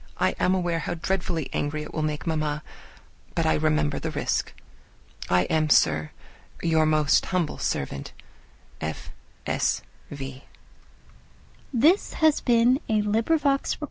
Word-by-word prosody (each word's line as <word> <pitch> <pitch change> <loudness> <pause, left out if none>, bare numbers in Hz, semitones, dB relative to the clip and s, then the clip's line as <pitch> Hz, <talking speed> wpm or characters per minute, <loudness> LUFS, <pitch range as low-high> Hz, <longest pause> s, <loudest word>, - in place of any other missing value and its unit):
I 95 0 +2
am 185 - +3
aware 175 -2 0
how 175 - -3
dreadfully 175 -2 -2
angry 150 +1 -2
it - - -10
will 155 - -2
make 150 -1 -2
mamma, 155 -2 -1 0.7
but - - +1
I - - +3
remember 75 -1 +1
the - - -3
risk. - - -1 0.8
I 90 0 +4
am, 155 +5 +1
Sir, 75 - +3 0.5
your 160 -2 +2
most 155 -1 +3
humble 180 -4 -1
servant, 70 0 -3 0.7
F. 80 0 -5 0.3
S. - - 0 0.3
V. 135 -2 -8 1.3
XXII 295 +8 +7
_Lady 390 - 0
Susan 255 -5 +3
to 220 - -1
Mrs. 225 +10 +1
Johnson. 275 -1 +1
155 Hz, 135 wpm, -25 LUFS, 135-195 Hz, 1.3 s, XXII